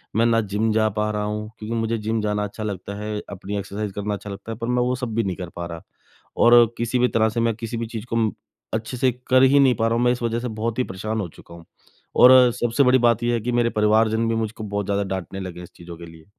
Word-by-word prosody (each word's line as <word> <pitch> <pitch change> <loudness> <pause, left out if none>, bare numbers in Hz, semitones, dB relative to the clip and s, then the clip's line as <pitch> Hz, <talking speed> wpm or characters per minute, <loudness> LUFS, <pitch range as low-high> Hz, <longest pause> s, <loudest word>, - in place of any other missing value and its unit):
मैं 115 - +3
ना 115 -1 +3
जिम 110 +1 +1
जा 110 0 +3
पा 105 0 -1
रहा 105 0 -2
हूँ, 105 +1 -4
क्योंकि 110 +2 -4
मुझे 115 0 -1
जिम 110 0 -2
जाना 105 0 -1
अच्छा 105 +2 -6
लगता 100 -1 -5
है, 105 0 -4
अपनी 100 +1 -5
एक्सरसाइज़ 100 +1 -5
करना 105 0 -3
अच्छा 100 +1 -7
लगता 100 +3 -7
है, 110 - -6
पर 115 0 -4
मैं 125 0 +1
वो 125 +1 0
सब 125 -3 -5
भी 115 - +1
नहीं 95 -3 -2
कर 90 -2 -6
पा 85 - -4
रहा। 85 -1 -8 0.6
और 120 0 +7
किसी 120 +2 -1
भी 125 - +4
तरह 110 -2 +2
से 115 +2 -3
मैं 115 -1 +1
किसी 115 +1 -5
भी 115 - -3
चीज़ 110 -1 -6
को 115 - -2
अम 110 -2 +2 0.4
अच्छे 110 +3 -3
से 130 0 +2 0.2
कर 130 +1 +5
ही 140 +2 +5
नहीं 130 -3 +5
पा 115 +1 +1
रहा 115 - +1
हूँ, 120 - +1
मैं 120 - +4
इस 125 0 -3
वजह 115 0 0
से 125 - -4
बहुत 110 +1 -3
ही - - +3
परेशान 110 +2 -4
हो 90 - -4
चुका 85 - -15
हूँ। 85 -1 -14 0.6
और 125 -1 +8
सबसे 120 +2 +1
बड़ी 130 0 +5
बात 120 -1 +2
ये 120 0 +1
है 120 - +1
कि 120 +3 -2
मेरे 120 -1 +2
परिवारजन 110 +1 +2
भी 115 - 0
मुझको 110 0 -3
बहुत 100 -1 -3
ज़्यादा 100 0 0
डाँटने 95 +1 -6
लगे 90 -2 -7
हैं - - -8
इस 85 - -13
चीज़ों 85 -1 -10
के 85 - -10
लिए। 80 -1 -15
110 Hz, 285 wpm, -22 LUFS, 105-120 Hz, 0.6 s, और